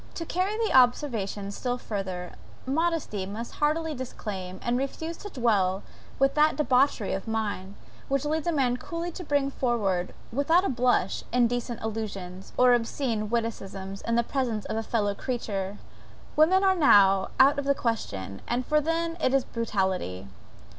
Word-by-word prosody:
To 330 - -4
carry 375 +6 -1
the 450 -1 0
observation 235 -6 +2
still 245 +4 -2
further, 190 -6 -5 0.3
modesty 280 - -1
must 220 +4 -6
heartily 315 +2 +1
disclaim, 195 -8 -6
and 240 - +1
refuse 295 +6 -3
to 410 - -8
dwell 205 - +1 0.3
with 275 0 +3
that 305 +1 +4
debauchery 260 -5 +2
of 195 +3 -4
mind, 205 -3 -3 0.3
which 275 +1 0
leads 310 +2 -1
a - - +3
man 260 -5 +1
coolly 335 +5 -5
to 360 - -7
bring 285 -3 +1
forward, 205 -9 0 0.2
without 325 +8 +3
a - - +1
blush, 245 -6 +1
indecent 245 -1 0
allusions, 195 -4 -5
or 250 0 +6
obscene 230 -2 -1
witticisms, 195 -4 -3
in 230 - -1
the 235 - +3
presence 235 -5 -2
of - - -3
a 225 - 0
fellow 215 -2 0
creature; 205 -5 -3 0.6
women 365 +6 +5
are 380 -1 +4
now 195 - +5
out 275 +2 +6
of 285 - -3
the 280 0 +3
question, 100 - -3 0.3
for 300 0 +3
then 330 +2 -1
it 260 - +3
is 270 - +3
brutality. 190 - -2
240 Hz, 155 wpm, -27 LUFS, 200-285 Hz, 0.6 s, or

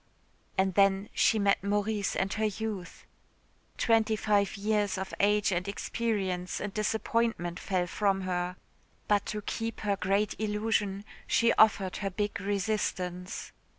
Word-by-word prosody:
And 190 0 +2
then 195 +1 +3
she 225 - +3
met 200 -2 +2
Maurice 205 0 0
and 195 0 0
her 220 0 0
youth. 210 -3 -4 0.7
Twenty 225 -1 +3
five 205 -1 +1
years 205 -1 0
of 190 0 -5
age 210 0 +3
and 180 +1 -1
experience 200 -4 -2
and 205 -1 -4
disappointment 215 -4 0
fell 185 -2 0
from 195 +2 0
her. 180 -1 -2 0.5
But 205 -1 +2
to 210 -1 -4
keep 225 +2 -4
her 205 -2 +1
great 195 +2 +1
illusion 210 -2 0 0.2
she 235 0 +4
offered 200 -4 +4
her 195 - -2
big 205 +1 -2
resistance.... 190 -3 -2
200 Hz, 135 wpm, -29 LUFS, 190-215 Hz, 0.7 s, she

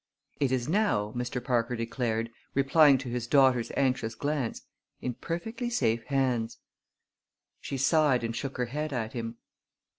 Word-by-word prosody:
"It 140 -3 +2
is 130 -1 0
now," 160 - +1
Mr. 125 0 -3
Parker 125 -1 +1
declared, 115 -1 -2 0.2
replying 140 +1 +6
to 130 0 -7
his 120 -1 -3
daughter's 130 -3 +4
anxious 125 -4 +1
glance, 145 -5 -2 0.4
"in 125 - -3
perfectly 225 - -4
safe 115 - +1
hands." 125 -5 0 1.0
She 135 - -4
sighed 140 -2 +3
and 115 0 -2
shook 135 +1 -4
her 125 - 0
head 150 +4 -3
at 115 -3 -3
him. 115 -1 -4
125 Hz, 145 wpm, -29 LUFS, 115-140 Hz, 1.0 s, replying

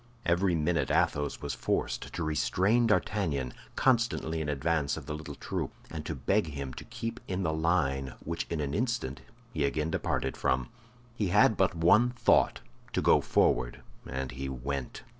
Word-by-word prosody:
Every 90 +1 +2
minute 75 -2 +1
Athos 75 0 +1
was - - -2
forced - - -2
to 85 - -3
restrain 95 +9 +2
D'Artagnan, 80 - 0 0.2
constantly 115 -10 +2
in 75 - -2
advance 75 +1 0
of 80 - -7
the 75 - -4
little 75 0 -7
troop, - - -3 0.2
and - - -5
to - - -3
beg 105 -3 +1
him 70 -3 -5
to - - -8
keep 115 +1 -5
in 95 0 -2
the 80 -2 0
line, 75 -5 0
which 85 +1 -3
in 85 -3 -1
an 70 -1 -2
instant 115 - -1 0.3
he 75 - 0
again 75 +3 0
departed 65 - -1
from. 65 -1 0 0.5
He 105 -4 0
had 105 +4 +5
but 95 -2 +2
one 85 +9 +5
thought—to 90 - +1
go - - +5
forward; - - +1 0.2
and 65 0 -3
he 65 +2 -5
went. 65 +1 -4
80 Hz, 165 wpm, -30 LUFS, 70-95 Hz, 0.5 s, had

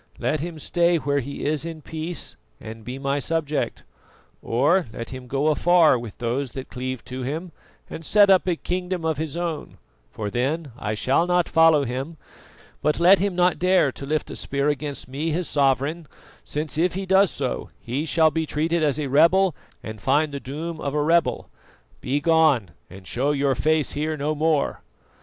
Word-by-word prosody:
Let 155 - -1
him 165 +2 -5
stay 170 +2 +2
where 145 -2 0
he 140 +2 -6
is 150 0 0
in 165 -2 -7
peace, 160 +2 -5 0.2
and 110 0 -9
be 125 +4 -6
my 140 +1 -1
subject; 155 0 -2 0.6
or 150 +10 +2
let 115 +2 -7
him 130 -1 -8
go 140 +4 +1
afar 170 0 +4
with 115 -3 -9
those 120 +2 -2
that 130 -1 -7
cleave 130 0 -5
to 130 +1 -6
him, 160 +7 -4 0.4
and 165 - -8
set 205 +5 +5
up 190 -1 +4
a 180 - +2
kingdom 180 0 -3
of 160 -3 0
his 160 0 -3
own, 170 -3 -4 0.3
for 105 -2 -5
then 140 +6 -1
I 110 -3 -3
shall 135 +10 +1
not 180 -1 +2
follow 165 -3 +5
him; 135 +6 -4 0.6
but 150 - +1
let 185 +3 +6
him 195 -1 0
not 180 0 +2
dare 180 -6 +3
to 140 - -8
lift 155 +1 -1
a - - -6
spear 140 +1 -1
against 145 -2 -3
me, 145 +5 -3
his 170 +2 -1
sovereign, 145 +3 +1 0.4
since 150 +1 -3
if 175 +1 +1
he 195 0 -3
does 190 0 +4
so 135 -4 -4
he 135 +7 -3
shall 160 0 +4
be 160 0 -2
treated 165 +3 0
as 150 -2 +1
a 150 - -1
rebel 165 +5 +4 0.3
and 110 -1 -8
find 145 +4 +2
the 140 - -4
doom 155 +5 -6
of 140 0 -3
a 150 - +2
rebel. 170 +2 +2 0.5
Begone, 145 - +2 0.2
and 95 +1 -12
show 130 +9 -1
your 140 -1 +1
face 155 +3 +1
here 155 +1 -2
no 150 +2 -1
more!" 155 -1 0
150 Hz, 185 wpm, -23 LUFS, 135-165 Hz, 0.6 s, let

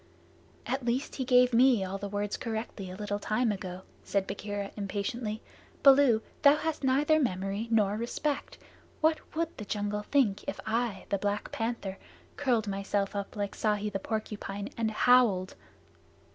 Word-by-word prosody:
"At 260 +3 -2
least 245 +4 -1
he 265 - -1
gave 250 -1 +5
me 240 -3 +5
all 195 +1 -4
the 200 - -5
Words 205 0 -2
correctly 220 -4 -4
a 185 - -7
little 205 0 -3
time 220 +3 +1
ago," 185 -2 -6 0.2
said 200 -1 0
Bagheera 205 0 -4
impatiently. 210 +2 -3 0.4
"Baloo, 270 -5 +6 0.2
thou 285 0 +7
hast 310 -1 -3
neither 290 +4 +3
memory 195 -3 -1
nor 210 -2 +2
respect. 275 +5 -2 0.4
What 315 0 +3 0.2
would 330 0 -1
the 210 - -6
jungle 205 0 -2
think 210 -3 +1
if - - -4
I, 225 -3 -1
the 200 - 0
Black 205 +1 -2
Panther, 225 -4 -3 0.4
curled 240 -6 +1
myself 195 0 -1
up 200 -1 -4
like 205 -1 -3
Ikki 210 -1 +1
the 195 - -2
Porcupine, 205 -1 -4
and 225 -1 0
howled?" 220 -5 +4
215 Hz, 155 wpm, -30 LUFS, 200-250 Hz, 0.4 s, thou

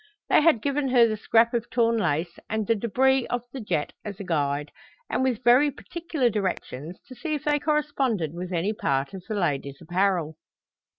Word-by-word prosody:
They - - +6
had 300 -8 +4
given 285 0 0
her 245 -2 +5
the 215 - -1
scrap 230 +2 +3
of 235 -1 -1
torn 230 -1 +2
lace 170 -3 -1
and 220 0 -1
the 230 - +3
débris 255 +4 +2
of 245 -1 -2
the 265 - -5
jet 155 -8 -2
as 205 -1 -7
a - - -5
guide, 145 -4 -1 0.4
with 255 -2 0
very 255 +5 +6
particular 320 -2 -2
directions 185 - -3
to - - -11
see 310 +4 -3
if 295 - -5
they 295 -1 +2
corresponded 275 - 0
with 180 +1 -6
any 180 +4 0
part 140 -4 -1
of 190 - -7
the 215 - -1
lady's 140 -7 -1
apparel. 175 -2 0
220 Hz, 185 wpm, -25 LUFS, 175-260 Hz, 0.4 s, They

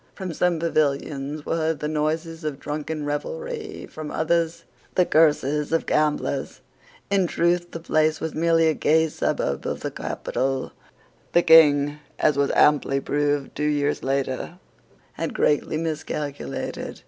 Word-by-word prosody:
From 185 -4 -5
some 180 +1 +1
pavilions 145 -2 -1
were 165 - -1
heard 160 -2 0
the 150 - -2
noises 160 +2 -2
of 150 -3 -3
drunken 150 +1 -4
revelry, 440 - -4
from 155 -1 -7
others 165 +1 0 0.3
the 180 - +4
curses 150 -2 +2
of 165 - +1
gamblers. 150 -2 0 0.5
In 195 -3 +3
truth 175 +1 +1
the 165 - -7
place 155 -1 +1
was 160 -1 -4
merely 165 0 +3
a 160 - +3
gay 160 +1 +2
suburb 70 - -2
of - - -3
the - - -3
capital. 135 0 -3 0.6
The 175 - +5
King, 150 -3 +6 0.2
as 150 - +3
was 140 0 +2
amply 145 -2 +4
proved 145 0 -1
two - - -5
years 145 0 0
later, 135 +4 -2 0.6
had - - -3
greatly 150 +1 +1
miscalculated. 150 -2 -4
155 Hz, 140 wpm, -24 LUFS, 145-165 Hz, 0.6 s, King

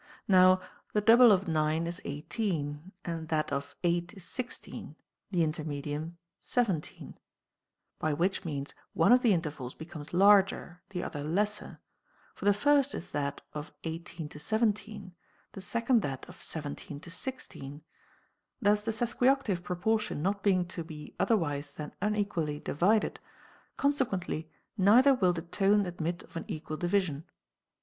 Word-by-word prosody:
Now 185 -1 +6 0.3
the 210 - +2
double 230 +2 +8
of 195 -1 +3
9 155 0 +1
is 170 0 -4
18, 150 0 -3
that 160 -2 -2
of 140 0 -3
8 175 +2 0
is 195 - -9
16, 245 +8 -5 0.3
the 180 -4 +2
intermedium 155 +1 -4 0.3
17; 200 -11 -2 0.8
by 155 - 0
which 175 +6 0
means 145 -4 -4 0.2
one 165 - +4
of 250 0 +7
the 235 - +4
intervals 150 -8 -2
becomes 160 -2 -9
larger, 195 -2 +4
the 180 -3 -4
other 145 - -4
lesser; 205 +7 -1 0.5
for - - -8
the 205 - +6
first 285 +4 +3
is - - -7
that 140 -1 -2
of 150 0 -6
18 165 0 -5
to 150 - -10
17, 210 0 -1 0.4
the 195 - -8
second 235 +4 +2
that 135 -5 -4
of - - -13
17 145 -1 -6
to 170 - -10
16. 155 - -6 0.8
Thus 205 +1 +3
the 220 - -4
sesquioctave 240 -2 +1
proportion 180 -1 -1
not 200 +2 0
being 185 -3 +3
to 170 -2 -3
be 155 -2 -9
otherwise 150 -10 +1
than 150 -1 -7
unequally 200 -8 0
divided, 200 +10 +1 0.6
consequently 195 - 0 0.3
neither 230 +8 +6
will 185 -8 +3
the 165 -1 -4
tone 195 +3 +2
admit 170 -1 -3
of - - -19
an 165 - -4
equal 155 0 -5
division. 175 -4 0
175 Hz, 140 wpm, -30 LUFS, 155-210 Hz, 0.8 s, double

